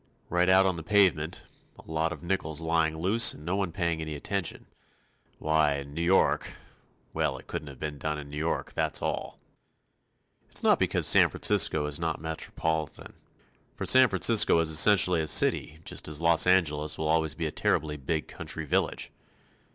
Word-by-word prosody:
Right 90 +1 +1
out 95 +1 +5
on 95 -2 0
the - - -6
pavement 85 -3 +1 0.3
a - - -15
lot 80 +1 -1
of 85 - -9
nickels 85 -4 -3
lying 80 -1 0
loose 100 +8 +4
and 75 - -14
no 90 +3 -2
one 95 -3 -2
paying 85 -2 -2
any 80 -1 -5
attention. 95 +4 -4 0.7
Why, 80 -2 +1
in 70 0 -8
New 85 - -4
York 90 +3 +1 0.6
well, 65 - -1
it 65 - -14
couldn't 70 -4 -8
be 75 -1 -4
done 75 +1 -4
in 75 -1 -9
New 75 +1 -9
York, 80 +2 -3
that's - - 0
all. - - -4 1.1
It's - - -6
not - - +3
because - - 0
San - - +5
Francisco 75 -1 +1
is 75 +1 -3
not 80 -1 -3
metropolitan. 80 0 -4 0.6
For - - -5
San 130 -1 +6
Francisco 115 -6 +3
is 80 -1 +1
essentially 90 +1 +5
a 80 - -4
city 75 0 +1
just - - -3
as 75 0 -4
Los 85 +1 +4
Angeles 75 -4 +1
will 80 - -3
always 80 -1 0
be 85 - -4
a 75 - -3
terribly 75 0 -1
big 75 +2 -4
country 80 - -6
village. - - -2
80 Hz, 175 wpm, -27 LUFS, 75-85 Hz, 1.1 s, San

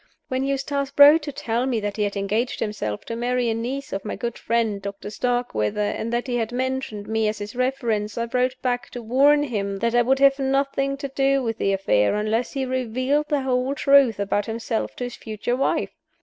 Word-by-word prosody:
When 260 0 -1
Eustace 275 0 -1
wrote 290 +3 +9
to 295 0 -5
tell 240 -1 -2
me 245 -4 0
that 205 -1 -3
he 215 - -3
had 200 0 -3
engaged 210 +5 -1
himself 110 - -3
to 230 - -4
marry 245 0 0
a - - +1
niece 255 +5 -4
of 195 0 -3
my 210 - -4
good 235 -1 -4
friend 225 -3 -1
Doctor 200 +1 -6
Starkweather, 245 - -1
and 215 +2 -1
that 240 +1 -1
he 245 -2 -1
had 225 -1 -2
mentioned 255 -4 -3
me 220 0 +1
as 210 0 -1
his 210 +2 -7
reference, 240 -5 -1
I 235 - 0
wrote 250 +2 0
back 245 -1 -1
to 245 - -6
warn 280 +6 +4
him 200 -7 -2
that 230 +3 0
I 240 - +5
would 260 +3 +2
have 275 0 +4
nothing 275 0 0
to 280 0 -4
do 275 0 +1
with 225 -1 -3
the 195 - +1
affair 190 - +2
unless 220 +3 -1
he 270 -2 -1
revealed 255 +3 0
the 290 -2 +1
whole 260 +1 0
truth 275 -7 +4
about 200 0 0
himself 225 0 -3
to - - -5
his 245 0 -5
future 220 +2 -3
wife. 265 - 0
245 Hz, 215 wpm, -23 LUFS, 215-270 Hz, -, wrote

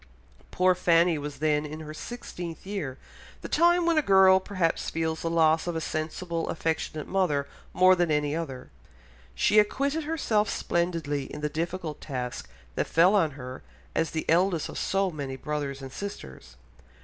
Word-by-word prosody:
Poor 185 0 +3
Fanny 170 -2 +3
was 145 0 -6
then 150 -1 +1
in 155 +1 -7
her 155 0 -8
sixteenth 175 -3 -7
year, 180 -10 -4 0.5
the - - -4
time 345 +1 +3
when 335 -2 +4
a - - +3
girl 190 -5 +6
perhaps 185 -4 -1
feels 160 0 -2
the 165 - -1
loss 160 0 +3
of 175 - -2
a - - 0
sensible, 165 +2 -3
affectionate 160 -2 -2
mother 150 -8 +1 0.2
more 185 0 +6
than 175 -2 +1
any 150 0 +1
other. 135 -6 -6 0.6
She 210 - +4
acquitted 280 +8 +1
herself 225 -10 +1
splendidly 165 -5 -1
in 150 - -7
the 150 - -1
difficult 165 0 -4
task 125 - -5 0.2
that - - -1
fell 175 +4 +5
on 165 -7 +3
her 130 -1 -8 0.3
as 165 - 0
the 160 - -3
eldest 175 0 +2
of - - -7
so 195 -1 0
many 140 -4 -5
brothers 140 -1 -4
and 135 - -7
sisters. 200 - -8
165 Hz, 165 wpm, -27 LUFS, 150-190 Hz, 0.6 s, girl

